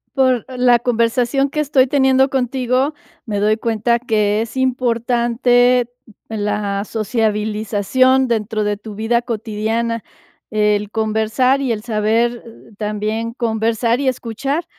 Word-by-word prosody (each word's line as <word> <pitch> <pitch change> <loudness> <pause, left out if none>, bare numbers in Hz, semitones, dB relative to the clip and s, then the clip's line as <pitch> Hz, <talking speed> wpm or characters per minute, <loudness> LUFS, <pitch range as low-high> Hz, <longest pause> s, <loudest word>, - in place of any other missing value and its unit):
Por 255 -3 +2
la 250 -2 +3
conversación 240 +3 +1
que 300 - -4
estoy 275 -3 +3
teniendo 265 -1 +3
contigo, 260 +2 0 0.3
me 205 -4 -2
doy 215 +1 +2
cuenta 230 +1 0
que 215 -3 0
es 230 - -10
importante 245 -1 +2 0.4
la 205 -2 -2
sociabilización 220 +3 +1
dentro 220 -2 -1
de 205 0 -1
tu 215 +1 -10
vida 225 +3 0
cotidiana, 225 0 -2 0.5
el 210 -1 +1
conversar 220 +5 +1
y 265 -3 -1
el 215 -2 -2
saber, 230 +2 0
eh, 230 - -15
también 215 +2 -3
conversar 230 0 0
y 280 - -1
escuchar. 260 +6 -2
230 Hz, 120 wpm, -18 LUFS, 215-250 Hz, 0.5 s, la